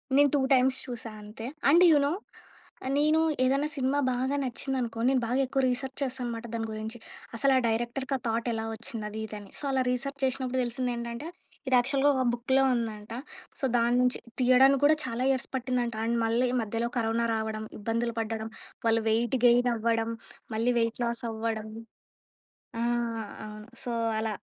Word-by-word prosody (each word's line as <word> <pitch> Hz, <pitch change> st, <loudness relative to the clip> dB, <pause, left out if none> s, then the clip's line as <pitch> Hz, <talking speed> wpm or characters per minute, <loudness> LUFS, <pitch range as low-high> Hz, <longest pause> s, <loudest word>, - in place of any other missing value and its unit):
నేను 285 Hz, +1 st, +6 dB
2 285 Hz, -, +3 dB
టైమ్స్ 260 Hz, 0 st, +4 dB
చూసా 235 Hz, -2 st, -5 dB
అంతే. 210 Hz, +2 st, -9 dB, 0.2 s
And 340 Hz, +5 st, +7 dB
you 305 Hz, -, +6 dB
know! 295 Hz, -, 0 dB, 0.8 s
నేను 305 Hz, +2 st, +4 dB, 0.2 s
ఏదైనా 275 Hz, +3 st, +2 dB
సినిమా 270 Hz, +2 st, +1 dB
బాగా 260 Hz, +3 st, 0 dB
నచ్చిందనుకో, 250 Hz, -2 st, -3 dB
నేను 265 Hz, -2 st, +2 dB
బాగా 250 Hz, +3 st, +1 dB
ఎక్కువ 265 Hz, +1 st, 0 dB
రీసెర్చ్ 260 Hz, +1 st, -3 dB
చేస్తా 260 Hz, -1 st, -2 dB
అనమాట 235 Hz, -1 st, -4 dB
దాని 225 Hz, -1 st, -2 dB
గురించి. 220 Hz, +2 st, -5 dB, 0.4 s
అసలు 275 Hz, +4 st, +3 dB
ఆ -, -, +5 dB
డైరెక్టర్‌కీ 240 Hz, +4 st, -1 dB
ఆ -, -, -13 dB
థాట్ 230 Hz, +1 st, -1 dB
ఎలా 220 Hz, 0 st, -2 dB
ఒచ్చింది 220 Hz, -1 st, -6 dB
అది 215 Hz, +1 st, -6 dB
ఇది 215 Hz, -, -8 dB
అని. 205 Hz, -, -13 dB
సో, -, -, -9 dB
అలా 265 Hz, -1 st, +2 dB
రీసెర్చ్ 275 Hz, +3 st, -3 dB
చేసినప్పుడు 260 Hz, -1 st, -1 dB
తెలిసిందెంటంటే, 240 Hz, +2 st, -3 dB, 0.4 s
ఇది 260 Hz, -, +4 dB
యాక్చువల్‌గా 275 Hz, +3 st, +2 dB
ఒక 260 Hz, -, +1 dB
బుక్‌లో 260 Hz, +3 st, +2 dB
ఉందంట. 220 Hz, -2 st, -4 dB, 0.5 s
సో, -, -, 0 dB
దాన్నుంచి 245 Hz, +2 st, +2 dB, 0.2 s
తీయడానికి 260 Hz, +2 st, +5 dB
కూడా 305 Hz, +2 st, +6 dB
చాలా 240 Hz, +1 st, -2 dB
ఇయర్స్ 260 Hz, -2 st, -1 dB
పట్టిందంట. 245 Hz, -2 st, -1 dB
అండ్ 235 Hz, +1 st, +1 dB
మళ్ళీ 235 Hz, +3 st, +2 dB, 0.2 s
మధ్యలో 230 Hz, +2 st, -2 dB
కరోనా 230 Hz, 0 st, +1 dB
రావడం, 220 Hz, 0 st, -3 dB
ఇబ్బందులు 230 Hz, +2 st, -1 dB
పడ్డడం, 225 Hz, 0 st, -3 dB, 0.4 s
వాళ్ళు 225 Hz, 0 st, +3 dB
వెయిట్ 235 Hz, +3 st, +1 dB
గెయిన్ 245 Hz, +1 st, +5 dB
అవ్వడం, 230 Hz, 0 st, 0 dB, 0.4 s
మళ్ళీ 235 Hz, +3 st, +2 dB
వెయిట్ 230 Hz, +2 st, -1 dB
లాస్ 235 Hz, 0 st, -2 dB
అవ్వడం. 220 Hz, -1 st, -3 dB, 1.1 s
ఆ! -, -, 0 dB, 0.6 s
అవును. 215 Hz, 0 st, -9 dB, 0.2 s
సో, 245 Hz, -, -3 dB, 0.3 s
అలా 220 Hz, 0 st, -1 dB
240 Hz, 165 wpm, -28 LUFS, 225-260 Hz, 1.1 s, అండ్